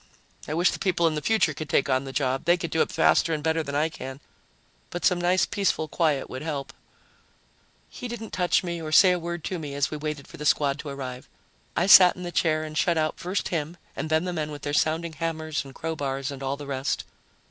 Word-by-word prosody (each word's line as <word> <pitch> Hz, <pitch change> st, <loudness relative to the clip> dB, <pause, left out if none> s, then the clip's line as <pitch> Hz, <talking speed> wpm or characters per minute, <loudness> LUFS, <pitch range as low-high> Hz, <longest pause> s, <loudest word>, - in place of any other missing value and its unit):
I 155 Hz, -, -2 dB
wish 175 Hz, +2 st, +3 dB
the -, -, -5 dB
people 175 Hz, -3 st, +1 dB
in 165 Hz, -, +3 dB
the 150 Hz, -, -2 dB
future 220 Hz, -7 st, +2 dB
could 155 Hz, +1 st, -7 dB
take 135 Hz, -, +2 dB
on 130 Hz, +1 st, +1 dB
the 135 Hz, -, -6 dB
job 135 Hz, -1 st, -1 dB
they 175 Hz, +1 st, +4 dB
could 170 Hz, -2 st, -5 dB
do 160 Hz, -, +2 dB
it -, -, 0 dB
faster 165 Hz, -, +3 dB
and 150 Hz, -, -6 dB
better 160 Hz, +1 st, +1 dB
than 140 Hz, -2 st, -5 dB
I 150 Hz, +2 st, +2 dB
can 135 Hz, -4 st, -8 dB, 0.7 s
but 175 Hz, -, -4 dB
some 180 Hz, -1 st, +3 dB
nice, 180 Hz, +1 st, +3 dB
peaceful 190 Hz, -5 st, 0 dB
quiet 150 Hz, -3 st, 0 dB
would 130 Hz, -, -7 dB
help." 140 Hz, -3 st, -4 dB, 1.1 s
He 250 Hz, -, -7 dB
didn't 230 Hz, -2 st, -7 dB
touch 180 Hz, 0 st, +2 dB
me 170 Hz, -2 st, -4 dB
or 155 Hz, -1 st, -5 dB
say 185 Hz, +4 st, +7 dB
a 180 Hz, -, +1 dB
word 170 Hz, -1 st, -5 dB
to 185 Hz, -, -3 dB
me 145 Hz, -3 st, -6 dB
as 140 Hz, -1 st, 0 dB
we 155 Hz, -, -3 dB
waited 150 Hz, -1 st, -5 dB
for -, -, -12 dB
the 150 Hz, -, -6 dB
squad 145 Hz, -1 st, +2 dB
to 150 Hz, -, -6 dB
arrive. 130 Hz, -2 st, -7 dB, 0.5 s
I -, -, +3 dB
sat 185 Hz, -2 st, +9 dB
in 180 Hz, -, -8 dB
the 175 Hz, -, -4 dB
chair 155 Hz, -2 st, +1 dB
and 155 Hz, 0 st, -7 dB
shut 170 Hz, +1 st, +2 dB
out 155 Hz, 0 st, 0 dB
first 185 Hz, +3 st, -2 dB
him 165 Hz, 0 st, -3 dB, 0.2 s
and 155 Hz, +3 st, -4 dB
then 160 Hz, +1 st, +2 dB
the 180 Hz, -1 st, -3 dB
men 155 Hz, -3 st, -2 dB
with 145 Hz, -1 st, -8 dB
their 145 Hz, -, -2 dB
sounding 160 Hz, +2 st, +1 dB
hammers 160 Hz, -1 st, -3 dB
and 135 Hz, -1 st, -13 dB
crowbars 140 Hz, -4 st, -3 dB
and 140 Hz, -1 st, -8 dB
all 135 Hz, +1 st, -2 dB
the 145 Hz, -, -8 dB
rest. 135 Hz, -1 st, -2 dB
155 Hz, 245 wpm, -26 LUFS, 140-170 Hz, 1.1 s, sat